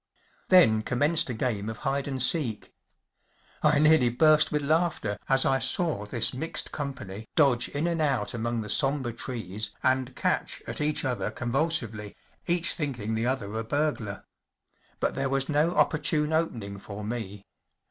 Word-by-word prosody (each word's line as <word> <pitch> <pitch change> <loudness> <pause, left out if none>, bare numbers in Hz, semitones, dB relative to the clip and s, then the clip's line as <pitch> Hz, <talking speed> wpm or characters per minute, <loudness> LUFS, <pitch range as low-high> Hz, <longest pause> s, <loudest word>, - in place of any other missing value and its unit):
Then 140 -13 +6
commenced 145 +8 +1
a - - -2
game 110 -3 -2
of 110 - -6
hide 135 +1 -1
and 135 -2 -3
seek. 125 -4 0 0.9
I 150 -1 +4
nearly 150 -4 +5
burst 155 +5 +4
with 150 -1 0
laughter 155 -8 0
as 135 0 +4
I 135 0 +2
saw 150 - 0
this 115 +2 +2
mixed 160 +6 -3
company 110 -8 -6
dodge 135 -6 +3
in 145 +3 -2
and 170 -2 0
out 135 -8 0
among 115 0 -2
the 105 - -7
sombre 135 -2 0
trees 110 -4 -5
and 130 0 +1
catch - - -1
at - - -4
each 150 0 +1
other 125 -2 -1
convulsively, 120 -5 -1 0.3
each 175 0 +3
thinking 125 -9 -3
the 115 +2 0
other 115 -6 -2
a 110 +1 -2
burglar. 115 -6 -2 0.7
But - - 0
there 135 0 -1
was 135 0 -1
no 155 +3 +1
opportune 150 0 +1
open¬ 160 -8 0
ing 100 0 -7
for 100 +1 -8
me. 105 -3 -5
130 Hz, 160 wpm, -27 LUFS, 110-150 Hz, 0.9 s, Then